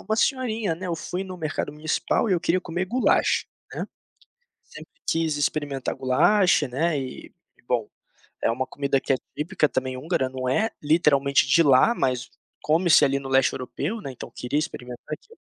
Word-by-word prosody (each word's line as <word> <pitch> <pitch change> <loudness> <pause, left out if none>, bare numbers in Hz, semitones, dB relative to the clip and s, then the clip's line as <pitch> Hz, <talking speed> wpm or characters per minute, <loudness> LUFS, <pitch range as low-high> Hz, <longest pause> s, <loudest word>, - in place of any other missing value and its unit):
uma 220 - -2
senhorinha, 230 - 0
né. 185 +3 -7
Eu 170 - -1
fui 180 +4 -4
no 185 -1 -8
mercado 155 -2 -3
municipal 155 +8 0
e - - +2
eu 175 - +2
queria 180 +2 +1
comer 175 +1 -3
Gulyás, 245 +5 +2 0.3
né. - - -4 0.8
Sempre - - -13 0.2
quis 160 -2 +1
experimentar 145 -2 -1
Gulyás, 175 +8 +3
né, 145 +4 0
e 130 -1 -7 0.3
bom, 120 -4 0 0.5
é - - +2
uma 130 +2 -2
comida 140 -1 0
que - - -1
é 130 - +1 0.2
típica 150 0 +1
também 130 0 -2
húngara, 135 -2 -1
não 130 -1 -4
é 215 +12 +2
literalmente 145 -3 +3
de 170 - +5
lá, 145 - +5
mas 130 -1 -1 0.3
come-se 165 0 +4
ali, 140 -1 +3
no 135 -1 -7
leste 135 0 +3
europeu, 150 - -4
né, 135 - -6
então 125 - -9
queria 135 +5 -1
experimentar 125 -6 -6
aquilo. 455 - -11
150 Hz, 175 wpm, -25 LUFS, 130-175 Hz, 0.8 s, de